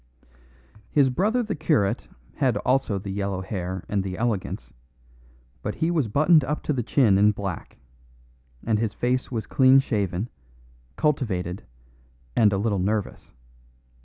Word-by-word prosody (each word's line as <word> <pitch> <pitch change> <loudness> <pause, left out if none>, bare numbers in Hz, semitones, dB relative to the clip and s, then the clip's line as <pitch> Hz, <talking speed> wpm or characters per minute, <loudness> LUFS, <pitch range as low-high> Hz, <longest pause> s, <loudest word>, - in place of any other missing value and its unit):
His 140 -3 +3
brother 215 - +1
the 220 - -3
curate 145 -10 0 0.3
had 130 -7 +2
also 125 -3 +1
the 95 0 -5
yellow 100 -1 -2
hair 95 -2 -4
and 100 -1 0
the 95 -1 -5
elegance, 100 - -3 0.9
but 105 - -4
he 165 +2 0
was 155 -8 +1
buttoned 155 +7 +4
up 150 +3 -3
to 150 - 0
the 130 - -1
chin 110 -4 +3
in 105 +1 +5
black, 100 -4 -6 0.9
and 110 -2 +1
his 110 -2 -2
face 125 +1 -1
was 110 -4 -3
clean 130 0 +5
shaven, 100 -6 0 0.7
cultivated, 100 - -1 0.7
and 105 -3 +5
a 100 - 0
little 100 -1 0
nervous. 105 +2 -2
110 Hz, 140 wpm, -25 LUFS, 100-135 Hz, 0.9 s, in